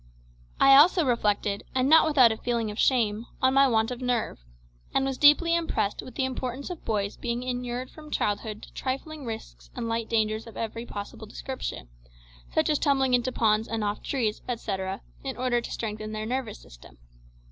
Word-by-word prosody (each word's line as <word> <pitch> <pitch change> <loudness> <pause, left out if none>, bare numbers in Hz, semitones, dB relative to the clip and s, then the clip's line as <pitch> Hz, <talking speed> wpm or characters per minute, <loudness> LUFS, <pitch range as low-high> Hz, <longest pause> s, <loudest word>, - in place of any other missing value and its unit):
I 275 0 +8
also 335 +3 +6
reflected, 210 -4 0
and 260 0 +2
not 320 +2 +7
without 260 -7 +6
a 220 - -3
feeling 235 -3 -1
of 210 - -8
shame, 230 -3 +2
on 260 0 +3
my 275 0 +6
want 225 -1 +2
of 250 0 -6
nerve, 245 - -1 0.6
and 270 - +3
was 270 -1 -1
deeply 300 +3 +6
impressed 245 -12 0
with 255 - -11
the 265 - 0
importance 260 +4 -4
of 350 - -8
boys 205 -2 -2
being 240 0 -3
inured 250 0 -4
from 305 -1 -12
childhood 210 -3 -2
to - - -12
trifling 275 +2 -4
risks 225 -1 -8
and 240 -2 -3
light 230 0 -2
dangers 220 0 0
of 230 - -11
every 230 +1 -4
possible 205 +2 -7
description, 215 - -6 0.6
such - - +2
as 300 - +2
tumbling 270 -3 +2
into 245 +1 +2
ponds 220 -2 +2
and 225 -1 -2
off 205 0 -2
trees, 225 -6 -1
etcetera, 195 -5 -3 0.2
in 270 -1 -4
order 245 -1 +1
to - - -8
strengthen 215 -1 -4
their 215 0 -3
nervous 245 -2 -3
system. - - -16
240 Hz, 185 wpm, -27 LUFS, 215-265 Hz, 0.6 s, I